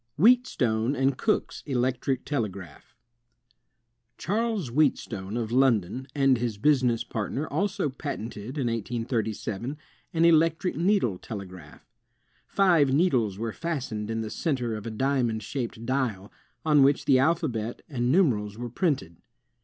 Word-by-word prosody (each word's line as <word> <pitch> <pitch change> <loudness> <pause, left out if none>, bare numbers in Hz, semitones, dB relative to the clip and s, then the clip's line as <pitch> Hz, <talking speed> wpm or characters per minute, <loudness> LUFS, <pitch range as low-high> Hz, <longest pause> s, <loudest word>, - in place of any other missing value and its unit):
Wheatstone 145 - +3
and 135 0 +1
Cook's 215 - -1
Electric 130 0 -1
Telegraph 100 - -5 1.2
Charles 215 - -1
Wheatstone, 120 -7 0
of 115 -2 -3
London, 125 -2 +2
and 135 -3 +3
his 115 -3 -2
business 125 -2 +2
part 110 -3 -4
ner 145 - -1
also 195 -1 -1
patented, 130 -3 -6
in 135 - 0
1837, 115 +1 -3 0.3
an 165 0 +2
electric 165 +2 +3
needle 170 - +1
telegraph. 90 -8 -9 0.6
Five 170 -8 +3
needles 130 - +2
were 115 0 -3
fastened 130 -11 -4
in 115 0 -2
the 110 - -5
center 130 -8 -1
of 105 +1 -6
a - - -2
diamond 120 -2 0
shaped 115 -1 -5
dial, 115 -7 -1 0.3
on 150 -2 +5
which 140 +1 +3
the 135 -3 +5
alphabet 130 -7 0
and 125 -4 -1
numerals 110 - +2
were 120 0 -5
printed. 135 - -1
125 Hz, 130 wpm, -27 LUFS, 110-150 Hz, 1.2 s, on